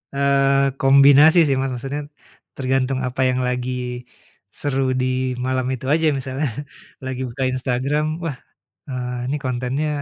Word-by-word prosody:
Eee, 140 -1 +2
kombinasi 140 +4 +7
sih 135 - +2
Mas 135 -1 -1
maksudnya, 135 +4 -4 0.5
tergantung 130 0 0
apa 130 +1 -3
yang 130 0 0
lagi, 125 0 -2 0.9
seru 135 -2 0
di - - +1 0.4
malam 130 -1 0
itu 130 0 -5
aja 160 0 +2
misalnya, 135 +3 -3 0.6
lagi 130 0 -4
buka 130 +3 -4
Instagram, 140 +5 -1
"Wah, 160 -5 -3 0.5
eee, 125 -1 -4
ini 145 +3 -1
kontennya, 130 +4 -1
135 Hz, 130 wpm, -21 LUFS, 130-140 Hz, 0.9 s, kombinasi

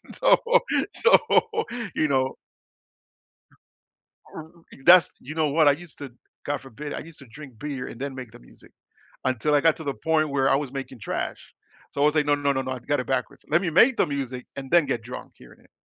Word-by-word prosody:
so - - +5 0.6
so, 480 - +6 0.8
you 155 - +2
know 130 -2 0 2.0
R - - -6
r 160 - -18 0.3
that's, 180 0 +7
you 145 +5 -8
know 155 -1 +1
what, 150 +1 +4
I - - +6
used 165 +3 -10
to, 140 -3 -8 0.3
God 145 0 -2
forbid, 135 +3 -8
I - - -4
used 165 0 -13
to 140 - -13
drink 130 -1 -13
beer 140 -2 -5
and 115 - -11
then 140 0 -4
make 125 -4 -9
the - - -13
music - - -19 0.5
until 130 +3 0
I 145 - +5
got 165 +1 +3
to 160 - -9
the 140 -2 -2
point 155 0 0
where 135 -1 +1
I - - +4
was 140 -2 -4
making 135 -2 -7
trash. - - -5 0.4
So - - -4
I - - +4
was, 150 +1 +3
like, 150 -1 +2
no, 145 0 +3
no, 145 -1 0
no, 135 -1 -1
no, 130 - -5
I've 125 -2 -8
got 145 - +1
it 125 - -6
backwards. 130 -2 -3
Let 155 +3 +4
me 185 - -2
make 230 - +4
the - - +3
music 130 -3 -5
and 135 -1 -7
then 170 -4 +4
get 125 -4 -2
drunk 125 +2 -9
hearing 60 - -18
it. - - -26
140 Hz, 225 wpm, -25 LUFS, 130-155 Hz, 2.0 s, that's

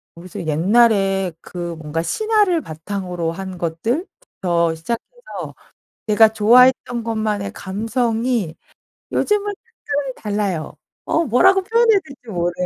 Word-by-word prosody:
모르겠어요. 175 0 -8
옛날에 195 +2 +3
그 175 -1 -6
뭔가 160 +1 -3
신화를 410 - +1
바탕으로 175 - -4
한 190 +1 -7
것들부터 175 - -2
시작해서 240 - -6 0.5
내가 220 +1 +6
좋아했던 240 +2 +4
것만의 215 -3 -2
감성이 225 -1 -1 0.6
요즘은 415 -1 +1
특별히 290 - -5
달라요. 205 -6 -3 0.3
어 330 - +1
뭐라고 375 - +4
표현해야 450 0 +4
될지 270 -5 -15
모르겠어. 175 -1 -1
215 Hz, 295 characters per minute, -20 LUFS, 175-265 Hz, 0.6 s, 내가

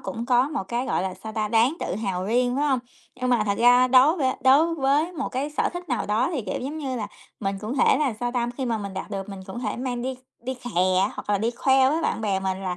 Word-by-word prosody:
cũng 230 +1 -5
có 250 +2 +3
một 300 -9 -3
cái, 240 +4 -2
gọi 240 - 0
là, 190 -1 -3
sao 220 - -9
ta, 215 -1 -1
đáng 235 +8 +3
tự - - -2
hào 195 -4 -2
riêng, 245 +4 +1
phải 290 - +1
hông? 265 -2 +2 0.4
Nhưng 255 0 -2
mà 235 -3 +3
thật 200 -1 -1
ra 245 +2 +6
đối 265 +6 +6
v - - -5 0.2
đối 295 +6 +5
với 295 +4 +1
một 330 - -3
cái 270 +3 -3
sở 300 - 0
thích 350 0 -7
nào 245 -4 -1
đó 225 +8 +1
thì, 275 -7 -2
kiểu, - - -4
giống 285 +5 -5
như 265 -4 -3
là, 215 -3 -3 0.3
mình 195 -1 -2
cũng 220 +6 -4
thể - - +4
là, 290 -5 +1
sao 245 0 -1
ta, 240 -1 0
khi 265 - -2
mà 230 -2 -1
mình 200 -2 -6
đạt 190 - -6
được 195 -1 -5
mình 195 -1 -7
cũng 200 +5 -6
thể 245 - -3
mang 245 -1 -3
đi 260 +1 -2 0.3
đi 260 +2 -4
khè 245 -1 -8 0.3
á, 200 - +1
hoặc - - -6
là 205 - +2
đi 225 +4 0
khoe 265 +2 +3
với 320 +3 0
bạn - - -1
bè 200 -3 0
mình 190 0 -2
là 180 -2 -3
245 Hz, 285 wpm, -24 LUFS, 210-265 Hz, 0.4 s, ra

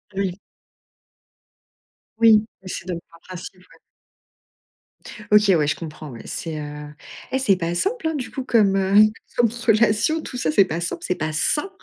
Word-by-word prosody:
Oui. 190 -1 -2 1.8
Oui 220 -2 +6 0.2
et 185 - -11
c'est 180 - -6
donc 170 -2 -4
par 165 - -18
principe 185 0 -10
ouais. 180 - -21 1.5
OK, 210 -1 +5
ouais, 150 -3 +2
je - - +1
comprends 155 -2 -8
ouais. 115 -2 -10
C'est, 160 -2 -5
heu, 150 0 -8 0.4
eh 265 - +1
c'est 250 -7 +3
pas 170 -1 -3
simple, 390 - -1
hein, 320 - -1
du 255 -3 -5
coup 265 - -4
comme, 215 -6 +3
heu, 195 0 +1 0.4
comme 240 - +5 0.2
relation, 225 +8 +3
tout 250 - -7
ça, 160 -9 0
c'est 195 +4 +5
pas 170 -1 -4
simple, 170 - -4
c'est - - 0
pas 155 0 -3
sain 295 - 0
190 Hz, 170 wpm, -22 LUFS, 165-230 Hz, 1.8 s, Oui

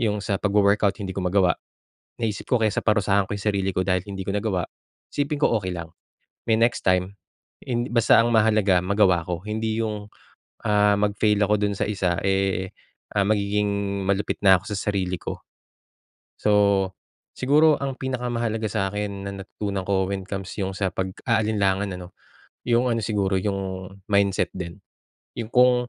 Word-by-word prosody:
'yong 105 -3 +1
sa 100 - 0
pagwo-workout, 100 0 +2
hindi 95 -1 -4
ko - - -1
magawa. 90 0 +3 0.7
Naisip 110 -3 -2
ko 125 - +4
kaysa 110 -2 +1
parusahan 100 -2 +2
ko - - -3
'yong 100 - -7
sarili 95 -1 0
ko 95 - +1
dahil 90 -1 +1
hindi 95 -1 -5
ko 100 - -1
nagawa, 100 -4 0 0.5
isipin 145 +1 -1
ko 115 - +4
okey 95 -2 -4
lang, 85 -2 -6 0.6
may 110 - +4
next 115 +1 +1
time, 90 +1 +2 0.5
hind 120 -1 -2
basta 115 -2 +5
ang 120 - +1
mahalaga 105 -4 +4
magawa 95 -2 +3
ko. 90 0 -3
Hindi 110 +1 -2
'yong, 105 -2 -4 0.6
ah, 105 -1 +4
mag-fail 105 0 +2
ako 105 +1 +2
do'n 100 -1 0
sa - - +1
isa, 90 -4 0
eh, 95 -1 0 0.5
ah, 100 - +4
magiging 105 0 +1 0.4
malupit 100 +1 0
na 95 -1 +8
ako - - -20
sa - - -1 0.2
sarili 95 -2 -1
ko. - - -6 1.0
So, 100 -2 +3 0.5
siguro 150 +3 +4
ang 135 -1 -2
pinakamahalaga 120 -4 -2
sa 95 -3 0
akin 100 -1 -4
na - - -4
natutunan 100 -1 -4
ko, 95 -1 +1
when 100 -1 -3
it - - -24
comes 95 -1 -4
'yong 95 -2 -2
sa 95 -2 0
pag-aalinlangan, 100 0 0
ano, 90 0 -11 0.5
'yong 120 +1 +3
ano, 115 - -1
siguro 100 -3 0
'yong 95 -2 -3 0.2
mindset 100 -1 +2
din. 85 -2 -6 0.6
'Yong 115 -1 -5
kung 125 0 +6
100 Hz, 165 wpm, -24 LUFS, 95-110 Hz, 1.0 s, na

